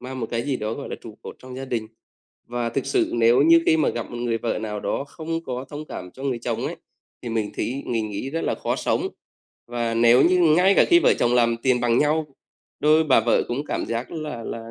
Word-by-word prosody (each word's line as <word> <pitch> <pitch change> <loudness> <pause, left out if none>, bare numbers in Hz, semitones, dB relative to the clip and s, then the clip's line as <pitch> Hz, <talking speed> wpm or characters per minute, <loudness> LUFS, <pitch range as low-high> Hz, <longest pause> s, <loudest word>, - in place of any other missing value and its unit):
mang 130 +1 -7
một 115 - -2
cái 115 0 -1
gì 140 -1 -1
đó 110 +1 -3
gọi 140 - -7
là - - -5
trụ 110 -1 -12
cột - - -9
trong 130 0 -10
gia 135 - -5
đình. 115 -4 -3 0.6
Và 120 0 -2
thực 125 +3 -3
sự - - +1
nếu 120 +3 +4
như 165 +1 +6
khi 160 - +5
mà 155 - +2
gặp 120 - -4
một 120 - -6
người 120 -1 -1
vợ 115 - -2
nào 105 -1 -4
đó 140 - -2
không 165 +1 -5
có 130 -1 -4
thông 150 +1 -7
cảm 90 -11 -8
cho 130 - -12
người 135 -3 -1
chồng 115 - -3
ấy, - - -5 0.5
thì 120 - -5
mình 110 -2 -2
thí 135 +3 -3
mình 115 -2 -1
nghĩ 105 +6 -4
rất 165 +3 -2
là - - 0
khó - - -2
sống. - - 0 0.6
Và 120 -1 -2
nếu 120 +3 +5
như 180 +1 +4 0.2
ngay 190 +2 +5
cả - - +6
khi 345 - +7
vợ - - +4
chồng 120 0 +2
làm 120 -1 +3
tiền 130 -2 +2
bằng 120 0 +2
nhau, 150 +1 +2 0.5
đôi 155 +2 +4
bà 135 -6 +4
vợ 115 +1 +2
cũng 130 +5 -2
cảm - - -3
giác 115 +2 -3
là 150 -8 -5
là 115 0 -7
120 Hz, 255 wpm, -23 LUFS, 115-145 Hz, 0.6 s, khi